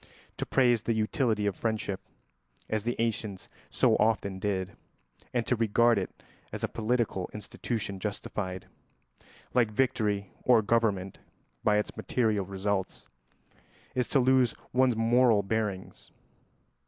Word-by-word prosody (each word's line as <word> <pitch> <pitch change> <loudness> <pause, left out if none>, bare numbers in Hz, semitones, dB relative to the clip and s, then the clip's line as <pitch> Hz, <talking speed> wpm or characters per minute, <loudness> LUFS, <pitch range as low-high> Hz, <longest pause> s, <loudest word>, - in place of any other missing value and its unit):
To - - -3
praise 120 -4 +3
the 115 +1 0
utility 110 0 +1
of 100 -2 0
friendship, 110 -4 -2 0.7
as 110 -1 -1
the 120 +3 -2
ancients 110 -4 -2 0.2
so - - +3
often 105 -3 +1
did, 95 -1 -2 0.6
and 120 -2 0
to 125 - +2
regard 115 0 +3
it 95 - -7 0.3
as - - -6
a - - +2
political 110 -5 -1
institution 105 -2 -4
justified, 95 -2 -4 0.9
like 120 -3 +3
victory 105 -4 0
or 120 -3 +5
government, 100 -4 0 0.4
by 105 -1 +4
its 105 - -2
material 110 -6 0
results, 95 0 -2 0.9
is 125 -2 0
to 140 - +3
lose 130 -2 +3 0.2
one's 130 -1 +4
moral 115 -1 +4
bearings. 100 -2 -3
110 Hz, 125 wpm, -29 LUFS, 100-120 Hz, 0.9 s, or